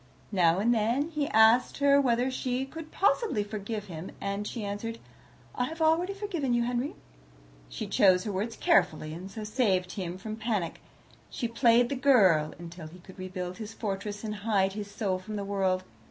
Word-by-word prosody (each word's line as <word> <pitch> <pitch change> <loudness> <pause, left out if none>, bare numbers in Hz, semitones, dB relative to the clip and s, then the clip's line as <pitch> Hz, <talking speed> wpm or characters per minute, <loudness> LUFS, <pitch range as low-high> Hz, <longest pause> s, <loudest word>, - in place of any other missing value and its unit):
Now 175 -4 +3
and 225 +5 +3
then 235 +7 +1
he 300 -2 -1
asked 220 +3 +5
her 280 0 +5
whether 250 0 +1
she 255 0 -2
could 315 +3 -9
possibly 395 - +1
forgive 210 0 -5
him, 170 -2 -7
and 200 +1 -3
she 230 -4 -5
answered, 210 +3 -4 0.6
"I 250 - 0
have 320 +5 -7
already 330 +5 +2
forgiven 345 -12 -1
you, 240 - +2
Henry." 245 +4 -2 0.7
She - - -5
chose 185 -2 +4
her 210 - -3
words 205 +4 -3
carefully, 155 -4 +2
and 180 +4 -8
so 215 +2 -7
saved 210 -5 +1
him 180 -2 -5
from 215 +3 -6
panic. 215 -7 -2 0.5
She 240 - -3
played 235 +1 +4
the 280 - -1
girl, 190 - +4
until 170 -1 -9
he 165 +3 -13
could 190 +1 -15
rebuild 185 -1 -5
his 225 0 -7
fortress 205 0 -4
and 210 -1 -4
hide 200 -2 +1
his 205 0 -6
soul 195 -3 -2
from 215 +3 -7
the 200 -1 -3
world. 190 -2 0
215 Hz, 185 wpm, -29 LUFS, 190-245 Hz, 0.7 s, asked